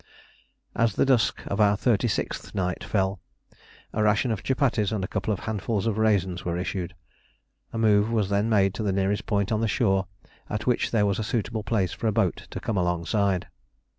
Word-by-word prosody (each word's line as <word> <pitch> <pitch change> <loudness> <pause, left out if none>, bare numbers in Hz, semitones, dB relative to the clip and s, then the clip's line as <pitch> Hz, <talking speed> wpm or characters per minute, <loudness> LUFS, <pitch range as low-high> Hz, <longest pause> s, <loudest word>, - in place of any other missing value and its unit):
As 115 -3 +2
the - - +3
dusk 130 -4 +2
of 100 +2 -1
our 105 -1 +4
thirty 120 +1 +2
sixth 105 - -3
night 90 -2 -1
fell, 95 -1 0 0.7
a 110 - 0
ration 105 +3 +2
of 110 - -2
chupatties 125 -6 +1
and 105 -3 -1
a - - -2
couple 110 - -2
of 100 - -2
handfuls 110 0 -2
of 110 -2 0
raisins 95 -5 +1
were 85 0 -2
issued. 90 -1 -3 0.8
A - - -5
move 105 -1 +3
was 105 -4 +1
then 100 +2 +1
made 100 -3 +3
to 100 - -5
the 105 -2 0
nearest 95 +1 0
point 100 -2 0
on 110 0 +1
the 115 - +1
shore 95 -4 +1 0.4
at 105 +2 -3
which 125 -2 +1
there 110 -3 +2
was 100 -2 0
a - - -1
suitable 110 0 -2
place 100 -3 0
for 115 - -3
a - - +3
boat 100 -5 0
to - - -5
come 110 - -2
alongside. 90 +2 0
105 Hz, 200 wpm, -26 LUFS, 95-110 Hz, 0.8 s, our